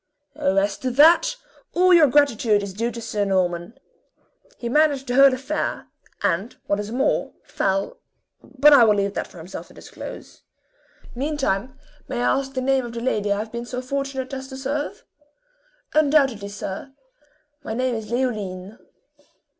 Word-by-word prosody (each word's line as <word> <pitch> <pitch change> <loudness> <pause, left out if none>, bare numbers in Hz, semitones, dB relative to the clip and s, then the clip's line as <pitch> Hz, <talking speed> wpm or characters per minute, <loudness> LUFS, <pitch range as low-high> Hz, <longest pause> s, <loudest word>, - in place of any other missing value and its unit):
"Oh, 190 - 0
as 200 0 +1
to 260 - -2
that, 330 - +5 0.4
all 365 +1 +5
your 330 -4 +7
gratitude 240 -7 +3
is 200 -1 -6
due 230 +4 -1
to 240 - -7
Sir 220 -2 -2
Norman. 185 0 -1 0.8
He 235 - -5
managed 285 +1 +2
the 245 - -3
whole 275 +1 +7
affair, 270 +4 -3 0.3
and 195 +8 -1
what 200 - 0
is 210 +1 -5
more, 260 +3 0
fell 195 0 -2 0.4
but 285 +2 +4
I 275 - +8
will 215 -2 +5
leave 200 0 0
that - - -3
for - - -16
himself 170 +3 -8
to - - -19
disclose. - - -10 0.7
Meantime, 260 -4 -2 0.3
may 255 -3 -3
I 245 - +2
ask 270 0 -7
the 260 - -1
name 265 0 +2
of 235 -1 -7
the 235 - -4
lady 210 -4 -1
I 200 - +2
have 215 +1 -5
been 235 0 -6
so 250 0 -4
fortunate 270 0 -4
as 265 0 -5
to 265 -1 -9
serve!" 290 +9 -4 0.9
"Undoubtedly, 275 -9 +2
sir 200 +6 -7 0.7
my 220 - -4
name 255 +1 0
is 220 -2 -5
Leoline." 215 -5 -3
245 Hz, 165 wpm, -23 LUFS, 205-275 Hz, 0.9 s, I